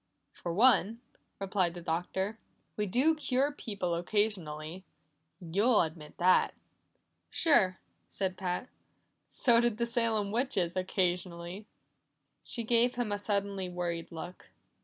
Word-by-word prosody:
"For 175 - -5
one," 225 +1 +4 0.4
replied 190 -3 0
the - - -6
Doctor, 190 +6 -2 0.4
"we 210 -1 -1
do 260 +11 +3
cure 280 -2 +1
people 200 -10 -3
occasionally. 175 -3 -2 0.6
You'll 200 +7 +3
admit 155 -2 -7
that." 180 +1 +4 0.7
"Sure," 190 - +3 0.3
said 190 -2 -2
Pat. 185 +5 -3 0.6
"So 235 -2 +4
did 240 -3 +1
the 235 - +1
Salem 230 -4 0
witches 215 -8 0
occasionally." 180 +1 -2 0.8
She 235 - -4
gave 235 +2 +3
him 240 -3 -1
a 205 - -1
suddenly 200 -2 -1
worried 175 -2 -3
look. 175 +2 -8
195 Hz, 115 wpm, -31 LUFS, 175-230 Hz, 0.8 s, one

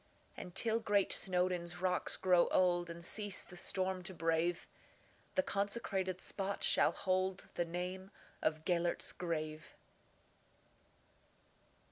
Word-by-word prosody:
And, 180 - -8
till 225 -1 +1
great 205 -3 +2
Snowdon's 180 -1 0
rocks 180 0 +1
grow 180 -2 +4
old, 175 -1 +2
And 170 0 -7
cease 205 +1 -1
the 180 - -13
storm 185 +1 0
to 180 +1 -4
brave, 165 +1 0 0.7
The 280 - +3
consecrated 200 -5 -1
spot 195 0 -3
shall - - +5
holdThe 185 -2 -1
name 180 +2 -4 0.3
of 155 0 0
"Gêlert's 175 -1 +1
Grave." 155 -3 -4
180 Hz, 110 wpm, -36 LUFS, 175-190 Hz, 0.7 s, shall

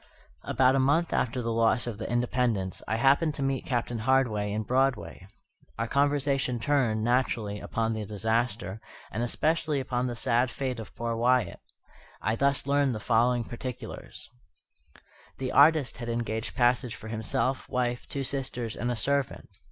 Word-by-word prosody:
About 130 0 +3
a - - +3
month 145 +6 +2
after 125 0 0
the 115 0 -1
loss 115 0 +2
of 115 -4 -5
the 110 - -4
Independence, 120 -5 0
I 110 - 0
happened 140 +6 +3
to 140 - -2
meet 135 -1 -1
Captain 120 -2 -1
Hardy 110 -4 +1
in 110 +1 -1
Broadway. 130 0 0 0.5
Our 115 +1 -1
conversation 140 -2 +1
turned, 115 -5 +1
naturally, 115 -4 0
upon 115 +1 -1
the 110 -1 -3
disaster, 110 0 -1 0.3
and 115 - -3
especially 155 +4 0
upon 125 -1 -1
the 120 - -3
sad 120 +2 +1
fate 125 0 -3
of 110 - -9
poor 115 0 -2
Wyatt. 120 -3 +2 0.6
I 110 +2 0
thus 140 +2 +1
learned 140 -3 +2
the - - -4
following 120 +2 +2
particulars: 120 0 -7 1.1
The 130 -1 -3
artist 150 -1 +5
had 120 0 -5
engaged 115 -1 -3
passage 125 -1 +2
for 110 - -10
himself, 130 +4 -1
wife, 120 -1 -1
two 140 - -3
sisters, 130 -4 -3
and 120 - -2
a 120 - 0
servant. 140 +3 -1
120 Hz, 160 wpm, -28 LUFS, 115-135 Hz, 1.1 s, artist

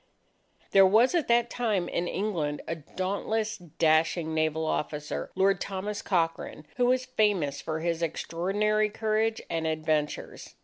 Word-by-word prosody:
There 195 - +7
was, 225 - +4
at 340 -4 +1
that 235 0 +3
time, 210 -7 0
in 175 - -2
England 170 -8 -2
a - - -1
dauntless, 200 +7 -3
dashing 160 0 +1
naval 160 0 0
officer, 150 -1 -3
Lord 190 0 +2
Thomas 200 +2 -4
Cochrane, 165 -3 -1
who 245 -1 +3
was 255 +1 +2
famous 205 - +1
for 160 0 -3
his 170 0 -1
extraordinary 200 +6 0
courage 220 +1 0
and 165 -1 -2
adventures. 155 -1 -2
185 Hz, 135 wpm, -28 LUFS, 160-215 Hz, -, There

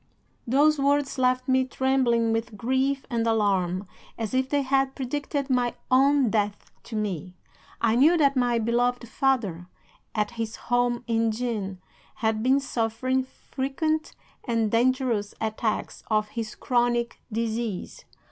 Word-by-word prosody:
"'Those 290 +4 +4
words 280 -1 +1
left 255 0 +2
me 260 0 +3
trembling 255 -3 +1
with 225 -1 -3
grief 265 +4 0
and 230 -1 0
alarm, 195 -4 +1 0.3
as 225 -1 -4
if 260 0 +1
they 285 -1 +1
had 270 0 +1
predicted 280 +1 -3
my 250 -2 +1 0.2
own 270 -2 +4
death 205 -2 -1
to 230 - -8
me. 185 -4 -3 0.4
I 230 -1 +2
knew 305 +8 +5
that 280 -3 +3
my 245 -2 +2
beloved 240 +2 0
father, 215 -11 0 0.5
at 210 0 0
his 225 -2 -4
home 245 0 0
in 230 -1 +1
Jean, 215 -5 -3 0.4
had 220 -1 0
been 260 +4 +4
suffering 255 0 -1
frequent 280 +4 -3 0.3
and 230 -3 0
dangerous 240 -3 +1
attacks 220 0 -2
of 215 -1 +1
his 225 -1 -5
chronic 240 -1 0
disease. 225 -2 -3
240 Hz, 135 wpm, -26 LUFS, 220-265 Hz, 0.5 s, knew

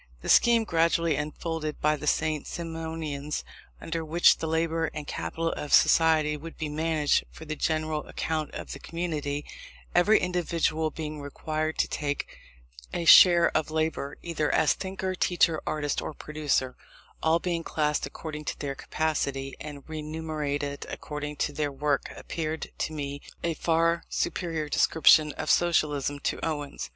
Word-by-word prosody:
The - - -4
scheme 235 -1 +6
gradually 165 -3 +2
unfolded 155 +1 -3
by 150 0 +2
the 150 0 -6
St. 155 -1 +1
Simonians, 160 -3 -4 0.4
under 165 0 -3
which 165 +2 +4
the 160 - -2
labour 165 0 0
and 150 - -5
capital 165 +3 -2
of 150 - -5
society 155 -2 +4
would 160 +3 -9
be 155 -2 -3
managed 155 -1 +1
for 160 - -11
the 155 0 -4
general 155 0 -1
account 155 -2 -2
of - - -6
the - - -6
community, 150 -4 -3 0.5
every 190 +5 +5
individual 170 -3 0
being 155 -1 -6
required 155 +2 -3
to - - +2
take 145 -1 -2 0.6
a 170 - -3
share 170 0 +8
of 155 0 +1
labour, 155 -3 -2
either 160 -3 -1
as 155 - +4
thinker, 190 -1 -4
teacher, 175 -3 +2
artist, 145 -2 -1
or 155 - -6
producer, 150 -4 -1 0.5
all 160 +1 +4
being 170 -1 -2
classed 150 -2 0
according 150 -1 -7
to - - -3
their 140 -2 -3
capacity, 140 -2 -2
and 145 -2 -9
remunerated 150 -2 -3
according 150 0 -5
to 145 - -1
their 145 -1 -1
work, 140 +1 -1
appeared 160 -1 -4
to - - -1
me 145 -2 -5 0.2
a 170 - +1
far 165 +1 +1
superior 165 -4 -2
description 155 0 +5
of - - -5
Socialism 145 -5 +2
to - - -2
Owen's. 145 - -3
155 Hz, 150 wpm, -27 LUFS, 150-165 Hz, 0.6 s, share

